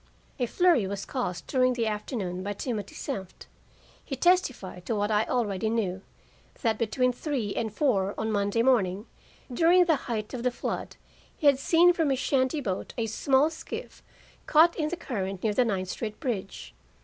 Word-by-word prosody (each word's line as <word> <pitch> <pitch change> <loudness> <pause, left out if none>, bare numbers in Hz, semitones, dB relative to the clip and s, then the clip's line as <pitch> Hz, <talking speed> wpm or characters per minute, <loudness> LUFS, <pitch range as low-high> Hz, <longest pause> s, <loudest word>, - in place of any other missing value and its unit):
A 245 - +1
flurry 340 - +3
was 200 0 -4
caused 180 -10 -3
during 255 -2 +2
the 235 -2 -1
afternoon 210 -4 -3
by 205 +2 -3
Timothy 210 -2 -4
Senft. 190 -2 -6 0.6
He 270 - -4
testified 260 - +1
to 230 - 0
what 205 +1 0
I 215 +1 +2
already 220 -4 -1
knew 195 -5 -1 0.6
that 225 -3 +1
between 250 +3 +1
three 245 -6 -3
and 220 -2 -2
four 205 -6 +1
on 220 0 -1
Monday 205 +2 +1
morning, 210 -6 +2 0.5
during 345 +7 +5
the 325 -2 +4
height 215 -1 -3
of 250 - -4
the 250 - +2
flood, 245 - -4 0.4
he - - -5
had 280 -2 +6
seen 345 +5 +5
from 325 -4 +1
his 270 - +1
shanty 265 +2 +1
boat 190 -7 -4
a 230 - 0
small 270 +7 +2
skiff 320 - -8 0.5
caught 325 +3 +5
in 305 -1 -1
the 350 - -4
current 195 - -4
near 215 -2 +1
the 250 - +3
Ninth 190 -4 -2
Street 215 +2 -5
bridge. 210 -7 -4
230 Hz, 175 wpm, -27 LUFS, 205-270 Hz, 0.6 s, had